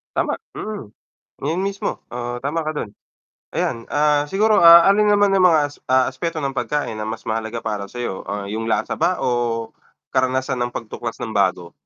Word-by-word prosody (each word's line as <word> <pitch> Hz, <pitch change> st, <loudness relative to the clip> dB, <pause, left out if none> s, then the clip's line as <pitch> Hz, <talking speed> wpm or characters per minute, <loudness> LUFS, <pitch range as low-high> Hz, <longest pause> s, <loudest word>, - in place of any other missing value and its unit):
Tama, -, -, +1 dB, 0.2 s
mm. 210 Hz, -, -6 dB, 0.5 s
Yun 160 Hz, +5 st, -1 dB
mismo. 200 Hz, 0 st, -3 dB
Ah, 120 Hz, 0 st, -4 dB
tama 155 Hz, +4 st, 0 dB
ka 155 Hz, -1 st, -4 dB
dun. 105 Hz, -8 st, -4 dB, 0.6 s
Ayan, 115 Hz, 0 st, -2 dB
ah, 150 Hz, 0 st, +3 dB
siguro, 210 Hz, +6 st, +3 dB
ah, 170 Hz, 0 st, +10 dB
alin 210 Hz, +1 st, +4 dB
naman 205 Hz, -1 st, +4 dB
yung 185 Hz, -1 st, +6 dB
mga 160 Hz, -3 st, +5 dB
as 145 Hz, -, -15 dB
ah, 130 Hz, 0 st, +3 dB
aspeto 165 Hz, -2 st, -4 dB
ng 135 Hz, -1 st, -3 dB
pagkain 125 Hz, -2 st, -2 dB
na 105 Hz, -, -4 dB
mas 110 Hz, +1 st, -5 dB
mahalaga 110 Hz, +1 st, -3 dB
para 105 Hz, -2 st, -3 dB
sa'yo, 120 Hz, -3 st, -5 dB
ah, 100 Hz, -1 st, -4 dB
yung 110 Hz, +1 st, -3 dB
lasa 115 Hz, -, 0 dB
ba 180 Hz, +1 st, +1 dB
o 120 Hz, -2 st, -1 dB, 0.4 s
karanasan 130 Hz, 0 st, 0 dB
ng 120 Hz, 0 st, -2 dB
pagtuklas 115 Hz, 0 st, -6 dB
ng 115 Hz, -, -4 dB
bago? 90 Hz, -3 st, +1 dB
130 Hz, 180 wpm, -21 LUFS, 115-160 Hz, 0.6 s, ah